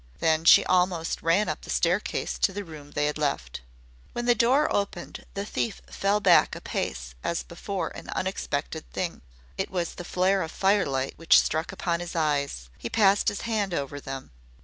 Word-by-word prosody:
Then 160 0 +2
she - - +8
almost 180 -2 +1
ran 170 +6 +3
up 155 -1 -3
the - - -12
staircase 180 +4 0
to - - +3
the 205 +1 -5
room 155 -5 -11
they 145 0 0
had 150 +1 -1
left. 60 - -2 0.5
When 240 - -3
the 240 - +5
door 250 +6 +3
opened 200 -3 -3
the 200 +1 -2
thief 215 +1 -2
fell 200 +1 +1
back - - +5
a - - -8
pace 60 0 -3
as 60 - -1
before 60 - -4
an - - -10
unexpected - - -3
thing. - - -4 0.4
It - - -1
was 175 -3 -2
the 175 - -7
flare 185 +2 +1
of 160 - -3
firelight 160 -10 +1
which 165 - +6
struck 160 +4 -1
upon 170 -3 -1
his 175 0 -6
eyes. 140 - -1
He 115 - -4
passed 205 -2 +4
his 205 - 0
hand 210 -6 -1
over 140 0 -3
them. 135 -1 -7
170 Hz, 185 wpm, -27 LUFS, 145-200 Hz, 0.5 s, she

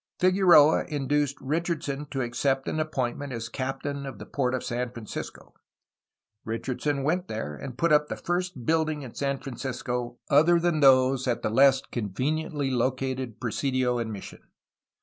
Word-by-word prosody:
Figueroa 180 -5 +6
induced 145 -1 -1
Richardson 150 -1 -2
to 135 -2 -3
accept 135 +3 0
an 155 - -1
appointment 140 -2 -2
as 115 -1 -5
captain 140 +3 -4
of 135 - -7
the - - -9
port 130 -2 -1
of 130 - -3
San 120 +1 -2
Francisco. 120 -3 -8 0.9
Richardson 135 +5 -2
went 175 +5 0
there, 90 - -4
and 125 - -8
put 170 +2 +2
up 150 0 +4
the - - -4
first 175 -7 -3
building 155 -1 +1
in 125 - -9
San 140 -1 -1
Francisco 125 -2 -4
other 160 +4 +5
than 170 -2 +1
those 130 -1 +5
at 120 - -1
the - - 0
less 135 +2 +5
conveniently 135 - -2
located 130 -1 -1
presidio 125 0 0
and 115 -1 -3
mission. 100 -2 -9
135 Hz, 150 wpm, -27 LUFS, 125-150 Hz, 0.9 s, Figueroa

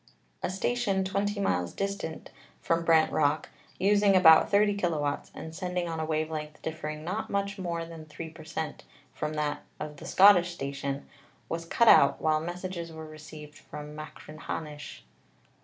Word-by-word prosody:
A - - -1
station 195 0 0
twenty 200 +2 -1
miles 90 - 0
distant 195 -5 -4 0.3
from 165 0 0
Brant 160 -1 +4
Rock, 150 0 +1 0.3
using 200 0 +4
about 160 -3 +7
30 205 0 +4
kw., 155 -7 -1
and 160 - -7
send 180 +1 -4
ing 175 -1 0
on 165 -1 -3
a 160 - -1
wave 155 0 -1
length 150 -1 -5
differing 155 -1 -4
not 185 +7 -3
much 200 0 -2
more 170 -2 -2
than 165 -1 -10
3 160 +2 -7
per 160 0 -12
cent, 160 0 -5 0.3
from 150 0 -3
that 150 -1 -1 0.2
of 150 -1 -6
the 165 - -9
Scottish 180 -3 +6
station, 140 -1 -4 0.4
was 165 0 -3
cut 235 +7 +2
out 140 - +7
while 155 -1 +2
messages 175 0 -5
were 160 0 -8
received 155 -1 -11
from 150 0 -9
Machrihanish." 150 0 -7
160 Hz, 160 wpm, -29 LUFS, 155-185 Hz, 0.4 s, about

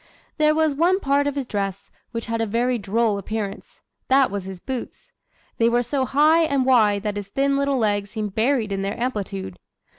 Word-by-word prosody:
"There 305 0 +4
was 315 -2 +2
one 345 +6 +2
part 285 -3 +1
of 285 - -2
his 275 -2 -2
dress 200 -4 -4 0.2
which 230 -1 -5
had 230 -1 -2
a 225 - 0
very 240 +3 0
droll 210 +1 0
appearance 205 0 -6 0.3
that 265 -2 +4
was 200 -2 -4
his 190 -1 -7
boots. 255 +4 -7 0.5
They 230 0 +4
were 240 +1 +2
so 260 +2 -1
high 305 +5 +4
and 280 -4 +1
wide 215 -6 +3
that 210 -1 -2
his 205 -1 -5
thin 275 +6 0
little 280 -1 +1
legs 205 -3 0
seemed 210 -3 -4
buried 225 -1 +1
in 195 0 -2
their 200 +4 -3
amplitude. 185 - -4
230 Hz, 200 wpm, -23 LUFS, 205-275 Hz, 0.5 s, There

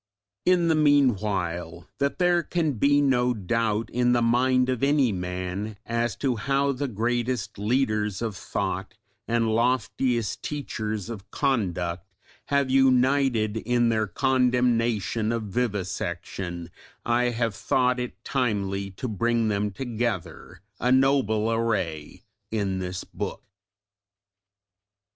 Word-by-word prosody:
In 180 -2 +4
the 165 - +4
meanwhile 100 - +1
that 140 0 0
there 175 -1 +3
can 170 -2 0
be 145 +5 +3
no 125 -3 +2
doubt 110 +2 -1
in 125 0 +2
the 120 - +2
mind 125 +2 +3
of 130 -2 -1
any 140 -3 +3
man 90 +3 -4
as 115 -2 -1
to 130 -4 -1
how 140 +5 +1
the 140 +1 -2
greatest 120 -1 -2
leaders 105 -3 0
of 115 -3 -3
thought 95 +4 -3 0.3
and 115 -1 +1
loftiest 120 -1 0
teachers 110 -8 -4
of 105 -4 -8
conduct 90 - -1 0.4
have 140 -2 +1
united 130 -4 +3
in 120 +1 +1
their 110 -1 +1
condemnation 120 -2 +1
of 115 -1 -1
vivisection, 90 -5 -3 0.3
I 120 +1 +2
have 115 -2 0
thought 125 +4 +1
it 120 -3 -6
timely 100 -6 -1
to 130 - -3
bring 115 +1 +1
them 105 0 0
together, 110 -7 -4 0.2
a 125 - +1
noble 130 -5 +3
array, 95 -8 -2 0.3
in 100 -4 -1
this 90 0 -4
book. - - -6
115 Hz, 120 wpm, -26 LUFS, 100-130 Hz, 0.4 s, In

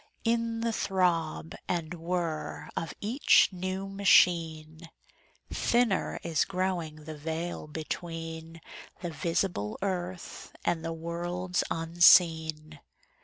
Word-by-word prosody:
In 230 0 0
the 230 0 0
throb 165 - 0
and 170 -2 -2
whir 165 -3 -3
of 165 - -3
each 235 +7 +4
new 185 +1 -4
machine 165 -5 +3 0.6
Thinner 235 -5 +1
is 165 -3 +1
growing 180 -5 -2
the 155 +1 -7
veil 160 +2 -4
between 165 +1 -6 0.4
The 175 - -3
visible 165 - -1
earth 185 -2 -4
and 165 -2 0
the 165 - -3
worlds 175 +2 -2
unseen. 160 -2 +4
170 Hz, 100 wpm, -29 LUFS, 160-185 Hz, 0.6 s, each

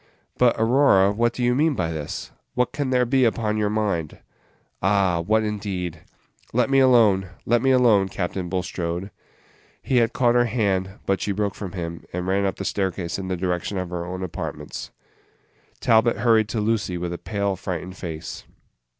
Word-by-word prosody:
"But, 125 -1 +5
Aurora, 115 -5 +4
what 115 +3 +1
do 125 - -4
you 120 0 +3
mean 150 +3 +2
by 85 -5 -1
this? 75 -2 -5 0.2
What 125 0 +1
can 140 -3 -2
there 125 -1 +3
be 130 +2 +2
upon 110 -2 +1
your 105 -1 +1
mind?" 100 -8 -1 0.6
"Ah! 95 -2 +2
what 110 +6 +2
indeed! 95 -6 -3 0.5
Let 125 +3 +2
me 135 - +5
alone, 110 -8 +4 0.2
let 120 0 +3
me 135 - +2
alone, 115 -7 +4
Captain 90 -1 -3
Bulstrode." 90 0 -3 0.7
He 130 - +1
had 115 -1 +3
caught 120 -1 +2
her 120 0 +4
hand, 100 -5 0 0.2
but 95 -1 0
she 105 - -1
broke 100 0 -1
from 95 -4 -7
him, 85 -2 -5
and 90 0 -3
ran 95 +2 +1
up 95 - -2
the 100 - -6
staircase 95 -3 -2
in 95 - -5
the 95 -1 -2
direction 90 +2 -2
of 90 -1 -4
her 85 -1 -3
own 90 +1 -5
apartments. 90 - -6 0.9
Talbot 115 0 +4
hurried 115 -3 +3
to 115 - -2
Lucy 105 -4 0
with 85 0 -3
a 85 - -6
pale, 100 -2 -1
frightened 90 0 -5
face. 80 -3 -6
100 Hz, 180 wpm, -23 LUFS, 90-115 Hz, 0.9 s, But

